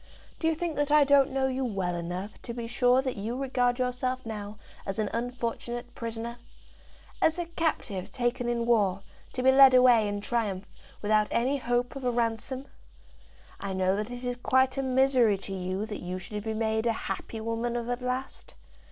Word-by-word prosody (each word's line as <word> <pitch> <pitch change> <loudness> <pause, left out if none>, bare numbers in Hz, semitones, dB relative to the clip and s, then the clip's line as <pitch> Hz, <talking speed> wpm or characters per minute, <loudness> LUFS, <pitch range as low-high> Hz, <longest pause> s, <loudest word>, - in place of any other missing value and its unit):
"Do 325 - 0
you 325 - +2
think 330 -1 -3
that 290 0 +1
I 300 0 +6
don't 280 0 +5
know 270 0 0
you 265 0 -1
well 195 -7 -1
enough 175 +4 -5
to 235 - -6
be 235 -1 -4
sure 250 +2 +3
that 260 -4 -3
you 225 +5 -3
regard 250 -2 +1
yourself 255 0 -1
now 210 -1 -6 0.3
as 195 - -4
an 215 -2 -1
unfortunate 240 0 -3
prisoner, 230 +1 -5 0.8
as 320 +1 +3
a 350 - -2
captive 305 - -2
taken 240 +1 -1
in 235 -1 0
war, 200 -5 +2 0.3
to 255 - -2
be 265 - +7
led 265 -1 +8
away 245 -4 +6
in 205 0 -2
triumph, 205 -3 -2 0.4
without 210 0 +3
any 260 +4 +1
hope 245 +1 0
of 275 - -6
a 250 - +2
ransom? 240 +3 -1 0.9
I 200 -1 -4
know 185 0 +2
that 210 +2 -3
it 245 0 -6
is 245 0 -2
quite 260 0 +3
a 270 - 0
misery 260 -5 +3
to 195 0 -6
you 185 +2 -2
that 215 -2 -6
you 180 +1 -4
should 210 +2 -6
be 220 0 -3
made 220 +1 0
a 230 - +3
happy 225 - -4
woman 230 +2 -2
of 235 -1 -2
at 245 +1 -2
last. 250 +1 -4
240 Hz, 195 wpm, -28 LUFS, 210-255 Hz, 0.9 s, led